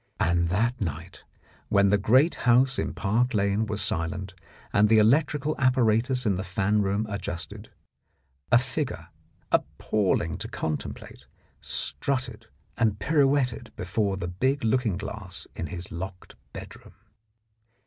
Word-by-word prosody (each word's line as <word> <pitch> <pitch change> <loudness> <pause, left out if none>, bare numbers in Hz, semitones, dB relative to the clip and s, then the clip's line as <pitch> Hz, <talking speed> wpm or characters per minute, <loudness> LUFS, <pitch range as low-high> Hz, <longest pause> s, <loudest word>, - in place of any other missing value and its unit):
And 85 0 +2
that 115 +7 0
night, 85 0 -5 0.5
when 100 0 +4
the 105 - +4
great 130 - +4 0.2
house 130 +3 +4
in - - -1
Park 115 +4 0
Lane 100 +2 +1
was 105 -1 -2
silent, 90 +4 -3 0.4
and 105 +1 +4
the 110 - +6
electrical 145 +6 +3
apparatus 125 0 +2
in 100 -4 +2
the 95 - -3
fan 95 +3 +1
room 100 +2 0
adjusted, 90 -5 -5 0.8
a 120 - +8
figure, 130 - -3 0.4
appalling 95 -5 0
to - - -5
contemplate, 75 -1 -5 0.3
strutted 120 - -2 0.3
and 110 -3 +2
pirouetted 135 -3 +1
before 95 +2 -1
the 90 -2 -4
big 130 +11 0
looking 115 -4 +1
glass 100 -1 -7
in 85 - -4
his 85 +3 -6
locked 90 +2 -7 0.2
bedroom. - - -11
105 Hz, 130 wpm, -26 LUFS, 95-125 Hz, 0.8 s, a